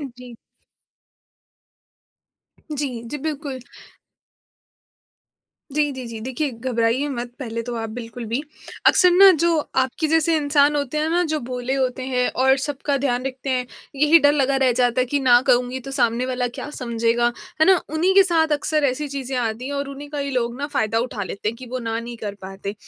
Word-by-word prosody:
अ, 290 - -5
जी। 250 -2 -11 2.4
जी, 265 -5 -3
जी, 295 - -4
बिल्कुल। 290 -4 -4 2.1
जी, 295 0 +1
जी, 260 -1 -7
जी, 225 -1 -7
देखिए, 260 +5 -2
घबराइए 235 +2 0
मत, 245 -3 -4
पहले 230 -3 -4
तो 240 0 -5
आप 225 -1 -4
बिल्कुल 230 0 -7
भी। 235 +5 -1 0.5
अक्सर 360 -1 +6
ना, 385 +2 +8
जो 335 0 +2 0.3
आपके 260 +5 -2
जैसे 325 +1 +3
इंसान 290 0 +3
होते 285 +1 -2
हैं 310 +1 0
ना, 350 +1 +2
जो 310 - 0
भोले 250 +1 -3
होते 260 -1 -1
हैं 250 -1 +1
और 265 +1 +5
सबका 285 0 -2
ध्यान 250 -1 0
रखते 265 +1 -5
हैं, 250 -1 0 0.3
यही 300 +4 +6
डर 290 - +5
लगा 275 -2 +2
रह 255 - +4
जाता 245 0 +2
है 255 - +3
कि, 285 +3 0
"ना 245 -2 +6
कहूँगी, 250 +1 +2
तो 270 - -5
सामने 250 -2 +1
वाला 250 -1 -1
क्या - - -5
समझेगा?" 235 -1 0 0.3
है - - +6
ना? 380 -1 +7 0.2
उन्हीं 355 +4 +2
के 390 - +8
साथ 325 -4 +2
अक्सर 305 0 0
ऐसी 280 +3 0
चीज़ें 270 -1 -4
आती 235 0 -2
हैं 285 - -4
और 280 0 -3
उन्हीं 280 +1 -8
का 295 - -5
ही 280 0 -2
लोग 240 -2 -1
ना 285 - -2
फ़ायदा 220 +1 +1
उठा 210 - -5
लेते 200 +3 -4
हैं 230 - -4
कि 255 - -10
वो 255 - -2
ना 225 -2 -3
नहीं 235 +1 -7
कर 205 -3 -5
पाते। 195 +1 -6
260 Hz, 195 wpm, -22 LUFS, 240-290 Hz, 2.4 s, ना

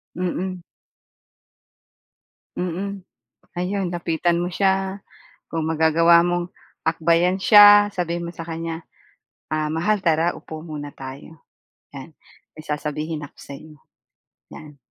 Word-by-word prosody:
Mm. 185 +1 -3 2.0
Mm. 185 +2 -4 0.5
Ayun, 185 +2 -2
lapitan 170 0 0
mo 175 - -2
siya, 190 0 0 0.5
kung 165 -1 -3
magagawa 160 +1 +4
mong 175 0 -1 0.3
akbayan 170 +3 +2
siya, 205 0 +8
sabihin 170 -2 -3
mo - - -7
sa 165 - -6
kanya, 165 0 -5 0.6
"Ah, 155 0 -1
mahal 185 +5 0
tara, 165 0 +2
upo 160 0 -9
muna 150 -3 -7
tayo," 135 +4 -10 0.6
'yan. - - -9 0.4
"May 155 - -11
sasabihin 150 +1 -4
ako 145 - -11
sa'yo," 150 +2 -11 0.8
'yan. 150 -2 -12
170 Hz, 110 wpm, -22 LUFS, 155-180 Hz, 2.0 s, siya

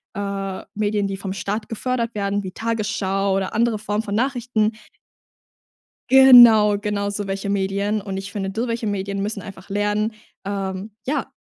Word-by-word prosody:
äh, 195 -1 -4
Medien, 205 -1 0
die 195 0 -4
vom 190 -1 -5
Staat 210 +2 -3
gefördert 235 0 -2
werden 200 0 -1
wie 185 - -6
Tagesschau 200 -3 -1
oder 195 -1 -2
andere 230 0 +2
Form 210 +1 -2
von 205 -2 -3
Nachrichten. 240 -3 0 1.4
Genau, 240 -6 +8
genau 205 0 -2
so 205 0 -4
welche 195 +1 -3
Medien. 200 +2 0
Und 195 -1 -5
ich 195 +1 -6
finde 195 -2 -3
so 225 +5 -2
welche 230 -1 -2
Medien 200 -1 -2
müssen 205 -1 -3
einfach 190 -1 -11
lernen, 210 +2 0 0.3
ähm, 195 0 -4 0.2
ja, 290 - -2
205 Hz, 155 wpm, -22 LUFS, 195-220 Hz, 1.4 s, Genau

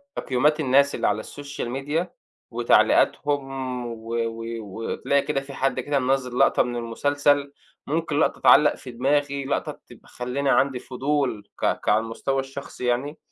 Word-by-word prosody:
تقييمات 150 +5 +1
الناس 140 0 +3
اللي - - 0
على 105 +1 0
الSocial 145 -3 -7
Media 145 +7 -2 0.4
وتعليقاتهم 130 +1 +1
و 115 -1 -8
و 115 -1 -2 0.2
وتلاقي 115 +7 -1
كده 135 - -1
في 140 0 -10
حد 135 0 0
كده 145 -1 0
مِنَزِّل 125 -1 0
لقطة - - +4
من 120 0 -4
المسلسل، 145 +4 +1 0.3
ممكن 155 0 -1
لقطة - - +1
تِعَلَّق 150 +1 +6
في 125 - -10
دماغي، 140 +2 0
لقطة 140 - -2
تب - - -14
خلّاني 125 +3 -3
عندي 135 -2 +2
فضول 130 -4 -2
ك - - +1
كعلى 105 - +3
المستوى 115 +4 -2
الشخصي 135 -1 -6
يعني، 130 +5 -1
135 Hz, 150 wpm, -24 LUFS, 120-145 Hz, 0.4 s, تِعَلَّق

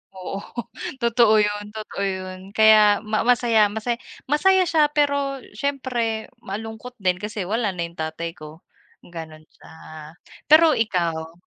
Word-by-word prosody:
Oo, 185 +1 -6 0.6
totoo 235 -2 +4
'yun 205 0 -2
totoo 215 -2 -5
'yun. 185 -1 -5 0.2
Kaya 215 -1 +6
ma 215 +1 -1
masaya 230 -3 +4
masaya, 220 +3 -3 0.3
masaya 380 +5 +4
siya 315 -4 +3
pero 280 -2 +1
siyempre 250 -6 -2
malungkot 220 +4 -7
din 180 -1 +1
kasi 210 -1 -4
wala 210 0 -1
na 170 - -2
'yung 170 -1 -9
tatay 160 +1 -4
ko, 155 0 -13 0.4
gano'n 160 -2 -10
siya. - - -19 0.8
Pero 315 +2 +7
ikaw? 170 - -1
215 Hz, 130 wpm, -23 LUFS, 185-245 Hz, 0.8 s, Pero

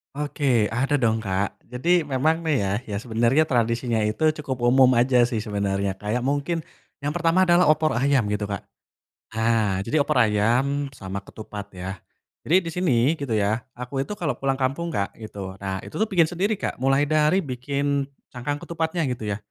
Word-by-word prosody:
Oke 140 -6 +1
ada 130 +5 -1
dong 115 -1 +3
Kak 95 +1 -1
jadi 160 +7 +1
memang 155 +5 0
nih 155 -3 +2
ya, 95 -1 -1
ya 105 - -5
sebenernya 120 +6 +2
tradisinya 115 -1 +1
itu 135 +9 +2
cukup 130 -4 -4
umum 130 +1 +6
aja 125 0 +4
sih 120 -2 -2
sebenernya 100 -2 -1
kayak 105 +5 -2
mungkin, 145 +5 -1 0.4
yang 145 - -1
pertama 165 +3 +2
adalah 175 +1 +6
opor 155 -3 +3
ayam 135 -4 +2
gitu 105 0 -1
Kak. 100 -1 -4 0.8
Nah 110 -4 +1
jadi 145 +8 +1
opor 140 - +1
ayam 125 +6 +2
sama 95 0 -5
ketupat 105 0 -9
ya, 95 0 -6 0.4
jadi 170 - +2
di 165 - -3
sini 150 -7 +2
gitu 120 -6 -1
ya 105 +3 +1 0.2
aku 125 +2 -4
itu 205 +10 -4
kalo 155 -5 -1
pulang 135 +2 -1
kampung 140 +6 -1
Kak 100 -11 -2
gitu 100 -3 -8
nah 95 -1 -3
itu - - -11
tuh 220 - +2
bikin 175 -5 +4
sendiri 185 +6 -1
Kak 185 - -4
mulai 135 +2 +3
dari 155 +5 +2
bikin 140 +2 -1 0.2
cangkang 130 +4 -3
ketupatnya 165 0 -2
gitu 110 -3 -5
ya, 100 - -1
130 Hz, 180 wpm, -24 LUFS, 110-150 Hz, 0.8 s, umum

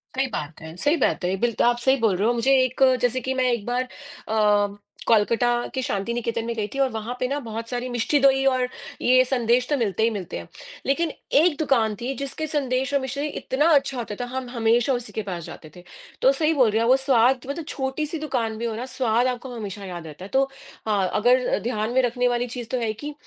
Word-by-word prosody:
सही 265 0 +1
बात 155 - -6
है 160 0 -9
सही 290 - +2
बात 260 - +1
है, 185 +2 +1
बिल्त 235 -2 0
आप 240 0 +4
सही 265 +2 +3
बोल 225 -6 +2
रहे 200 +4 +1
हो। 240 - +3
मुझे 240 +3 +1
एक 255 +1 0 0.2
जैसे 245 +1 +1
कि 260 +2 -2
मैं 255 -1 +1
एक 230 -4 -2
बार 245 +1 0
अ, 255 - -12 1.2
कोलकाता 235 +2 +2
के 260 - 0
शांति 235 -3 -2
निकेतन 230 -1 -2
में 235 - -2
गई 210 -2 -2
थी 275 - -4
और 270 - +3
वहाँ 225 +2 -4
पे 255 - 0
ना 280 +3 -2
बहुत 225 +1 -5
सारी 245 0 -3
मिष्टी 245 +4 +1
दोई 270 0 +4
और 255 -2 +2 0.3
ये 255 +1 +5
संदेश 245 -1 +1
तो 295 - +2
मिलते 220 -3 0
ही 230 - +4
मिलते 195 -6 -5
हैं, - - -10 0.4
लेकिन 320 +4 +1 0.3
एक 320 -1 +3
दुकान 230 -8 +2
थी 255 +3 -2
जिसके 275 +3 -4
संदेश 270 -2 -1
और 280 - +3
मिश्री 280 +3 -3
इतना 295 +1 0
अच्छा 275 -2 +1
होता 225 -4 -4
था, 245 - -2
हम 255 0 -5
हमेशा 235 +2 +2
उसी 245 0 -4
के 220 - -2
पास 170 -2 -4
जाते 155 - -10
थे। 180 - -12 0.4
तो 265 - +6
सही 310 +3 +1
बोल 255 -7 +4
रहे 220 +2 +1
हैं, 230 - +2
वो 260 - +6
स्वाद 260 -1 +3
मतलब 300 +2 -4
छोटी-सी 290 +4 -3
दुकान 245 -7 -2
भी 235 - -3
हो 225 - -2
ना, 240 +3 -4
स्वाद 245 -2 +1
आपको 250 0 -4
हमेशा 205 -2 -6
याद 175 -3 -7
रहता 155 +4 -9
है, 200 - -10
तो 270 +1 +4 0.4
हाँ, 195 -4 +1
अगर 245 +4 +3
अ, - - +1
ध्यान 220 -1 -1
में 260 - +4
रखने 245 0 +1
वाली 245 0 0
चीज़ 240 -1 -6
तो 255 - 0
है, 225 - 0
कि 295 +7 -7
245 Hz, 240 wpm, -24 LUFS, 225-265 Hz, 1.2 s, तो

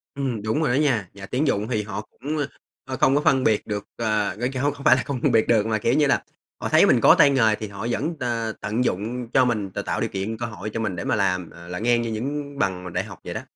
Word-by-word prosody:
Ừm, 130 -6 -2
đúng 110 +9 -1
rồi 150 - +1
đó - - +3
nha, 115 - +1
nhà 100 -1 -9
tuyển 130 +9 -1
dụng 105 -3 0
thì 110 -4 -1
họ 105 0 -5
cũng, 145 +8 -6 0.5
ờ, 130 -1 -4
không 135 - +4
có 145 - +3
phân 135 -3 +3
biệt 110 -4 +1
được, 105 -1 -3
ờ, 110 -4 0
cái 130 +1 -1
không, 145 0 +2
không 140 -1 -11
phải 130 - +7
là 130 - -1
không 135 -3 -4
phân - - +2
biệt 110 - +3
được 110 -3 +3
mà, 110 -1 +1
kiểu 115 +3 +1
như 150 +1 +3
là, - - +2 0.4
họ - - -2
thấy - - +6
mình - - +4
có - - +7
tay 145 - +6
nghề 115 -6 +3
thì 110 - -6
họ 100 +3 -6
vẫn, 150 +7 -1
ờ, 115 -3 -2
tận 110 +5 -1
dụng 120 +3 -2
cho 130 - +5
mình, 105 -6 -1
t - - -14
tạo - - -2
điều - - 0
kiện, 100 +3 -3
cơ 120 - -3
hội 105 -3 -6
cho - - -2
mình 105 -5 -2
để 85 - -4
mà - - +1
làm, 90 -4 0
à, 85 0 -13
là 90 0 -5
ngang 120 +2 +2
như 115 - -3
những 140 +5 -4
bằng 90 -5 0
mà 90 - -6
đại 90 +1 -2
học 100 -3 -11
vậy - - -6
đó. - - -4
115 Hz, 295 wpm, -24 LUFS, 105-130 Hz, 0.5 s, phải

